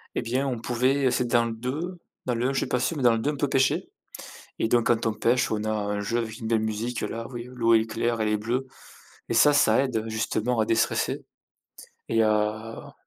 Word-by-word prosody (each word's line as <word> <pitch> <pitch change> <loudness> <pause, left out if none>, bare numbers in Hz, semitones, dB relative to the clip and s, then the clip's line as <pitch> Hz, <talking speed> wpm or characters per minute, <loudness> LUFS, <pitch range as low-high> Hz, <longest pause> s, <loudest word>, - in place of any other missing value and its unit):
et - - 0
bien, 130 +4 -1
on 125 -3 -2
pouvait 130 +3 +1
c'est 125 - +1
dans 120 0 +3
le 115 - -3
2, 150 +10 -4 0.3
dans 125 - 0
le 120 +3 0
1 135 - -1
je - - +1
suis - - -1
pas 125 - 0
sûr 155 +6 -1
mais 135 - -2
dans 120 - +6
le 115 - 0
2 145 +6 0
on 145 - -6
peut 145 - 0
pêcher. 135 -1 +1 0.7
Et - - +2
donc 120 0 +2
quand 115 -1 +2
on 110 - +2
pêche, 115 +4 +1
on 105 -1 -1
a 110 - -1
un 105 -1 -1
jeu 110 +4 -1
avec 115 -1 -4
une 115 - -6
belle 110 -1 +2
musique 110 +2 -2
là, 115 +2 -4
oui, 120 -1 -7
l'eau 115 -2 +3
est 110 0 +3
claire, 115 +1 -1
elle 110 - +1
est 105 - +2
bleue 120 +5 -2 0.6
et - - -1
ça, 150 - +6
ça 120 -3 +4
aide, 130 -4 -2
heu, 110 0 -2
justement, 110 +1 -1
à - - +3
déstresse 115 0 +1 1.0
et 115 0 +3
à 110 +1 -1
115 Hz, 245 wpm, -26 LUFS, 110-125 Hz, 1.0 s, dans